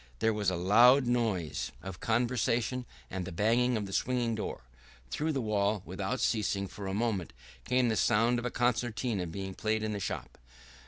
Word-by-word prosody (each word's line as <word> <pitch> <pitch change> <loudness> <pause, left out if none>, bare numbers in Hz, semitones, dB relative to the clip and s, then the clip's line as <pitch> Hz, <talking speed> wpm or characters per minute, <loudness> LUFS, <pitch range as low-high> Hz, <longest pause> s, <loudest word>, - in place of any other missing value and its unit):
There 110 - +2
was 105 -2 +1
a 90 - -1
loud 120 +9 +6
noise 110 -10 -1
of 95 -2 -7
conversation 120 +1 0 0.2
and 95 -1 -3
the 95 - -6
banging 115 +7 +2
of 105 - -3
the 95 - -7
swing 120 0 0
door. 110 - -4 0.5
Through 155 +2 0
the 135 - -1
wall, 105 -2 0
without 95 +7 -3
ceasing 100 -3 0
for 100 +1 -7
a 95 - -2
moment, 105 - -1 0.3
came 125 0 +2
the 110 - +1
sound 115 +4 +3
of 120 - -5
a - - 0
concertina 120 -5 0
being 95 +3 -5
played 110 +2 -1
in 110 - -1
the 100 - -3
shop. - - -5
110 Hz, 180 wpm, -31 LUFS, 100-120 Hz, 0.5 s, loud